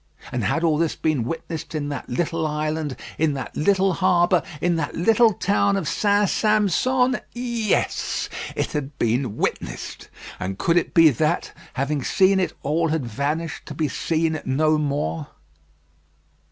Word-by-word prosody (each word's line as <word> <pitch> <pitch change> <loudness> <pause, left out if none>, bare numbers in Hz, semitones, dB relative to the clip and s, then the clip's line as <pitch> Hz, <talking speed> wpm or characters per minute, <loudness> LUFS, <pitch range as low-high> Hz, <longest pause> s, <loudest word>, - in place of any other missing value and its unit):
And 120 - -2
had 160 - 0
all 155 -2 +2
this 165 -2 +1
been 150 -7 0
witnessed 165 +2 -5
in 145 -1 -2
that 145 - -5
little 160 +4 -1
island, 150 -1 -2 0.2
in 155 -2 +2
that 135 - -6
little 195 +3 +2
harbour, 180 0 +3 0.2
in 175 +2 +1
that 155 -3 -3
little 225 +6 +4
town 200 +1 +1
of 180 -6 -2
St. 205 +3 +2
Sampson? 235 +6 +2
Yes; 235 -4 -1 0.3
it - - -1
had 140 -1 -4
been 120 -1 0
witnessed. - - -4 0.3
And 95 +1 -4
could 170 - +2
it 175 - 0
be 165 -2 +7
that, 150 +5 0 0.2
having 140 +1 -1
seen 190 +5 +3
it, 185 - 0
all 160 +4 +1
had 155 -4 -1
vanished 145 +8 -3
to - - -7
be 155 - 0
seen 160 0 -1
no 155 +3 +2
more. 80 - -2
160 Hz, 155 wpm, -23 LUFS, 145-185 Hz, 0.3 s, be